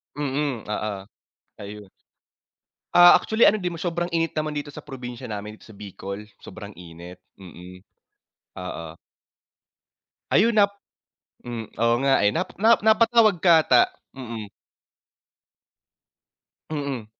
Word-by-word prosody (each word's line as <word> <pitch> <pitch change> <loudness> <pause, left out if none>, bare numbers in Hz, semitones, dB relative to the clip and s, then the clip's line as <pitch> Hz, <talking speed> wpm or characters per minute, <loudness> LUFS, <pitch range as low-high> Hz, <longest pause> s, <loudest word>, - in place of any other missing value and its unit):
Mm, 140 -4 -2
oo, 105 -2 -3 0.6
ayun. 105 -1 -10 1.0
Ah, 175 0 +8
actually 220 +1 +2
ano 215 - +4
din 180 -4 -4
sobrang 175 0 -3
init 165 0 -1
naman 155 0 -2
dito 145 0 -5
sa 145 - -11
probinsya 125 -2 -8
namin 105 0 -7
dito - - -19
sa 110 - -14
Bicol, 100 +1 -8 0.2
sobrang 105 -1 -10
init, 85 +1 -12 0.2
mm, 90 0 -13 0.8
oo. 90 -2 -6 1.5
Ayun, 220 +3 +3
nap 200 -1 +5 0.7
hmm, 120 -2 -6 0.2
oo 115 0 +3
nga, 135 - +4
eh. 105 - +4
Na - - -1 0.2
na 230 +1 +6
napatawag 220 -3 +3
ka 165 -3 +5
ata, 125 -2 +5 0.3
mm. 115 -5 -8 2.2
Mm. 140 -6 -4
125 Hz, 120 wpm, -23 LUFS, 105-175 Hz, 2.2 s, Ah